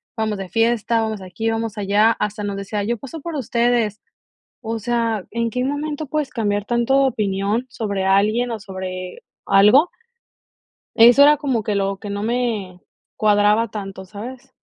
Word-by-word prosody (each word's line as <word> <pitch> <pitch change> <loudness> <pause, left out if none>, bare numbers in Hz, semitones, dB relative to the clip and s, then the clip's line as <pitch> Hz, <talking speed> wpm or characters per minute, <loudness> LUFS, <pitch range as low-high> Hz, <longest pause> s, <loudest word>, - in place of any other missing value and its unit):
vamos 220 -2 -1
de 195 -1 -6
fiesta, 230 +1 +1
vamos 220 -2 -3
aquí, 190 +5 -3
vamos 225 -1 -3
allá. 205 +2 +3
Hasta 210 0 -2
nos 200 -1 -3
decía: 200 +1 -3
"Yo 235 +3 -1
paso 275 +7 -8
por 335 +2 -6
ustedes". 235 -4 0 0.6
O 225 -1 -4
sea, 230 -2 -1
¿en 230 +1 -1
qué 250 +3 -2
momento 295 +2 -3
puedes 295 -1 -2
cambiar 205 -4 -1
tanto 240 +4 +2
de 270 - +4
opinión 210 +1 -1
sobre 200 -5 -3
alguien 210 +5 +2
o 225 - -5
sobre 185 -2 -7 0.2
algo? 210 - +5 1.0
Eso 240 +4 +7
era 295 +1 +7
como 265 -6 -1
que 210 - -1
lo 195 -1 -1
que 205 - -8
no 200 0 -3
me 220 -6 -2 0.4
cuadraba 210 +1 +3
tanto, 195 -2 -7
¿sabes? 245 +7 -9
220 Hz, 165 wpm, -20 LUFS, 200-240 Hz, 1.0 s, Eso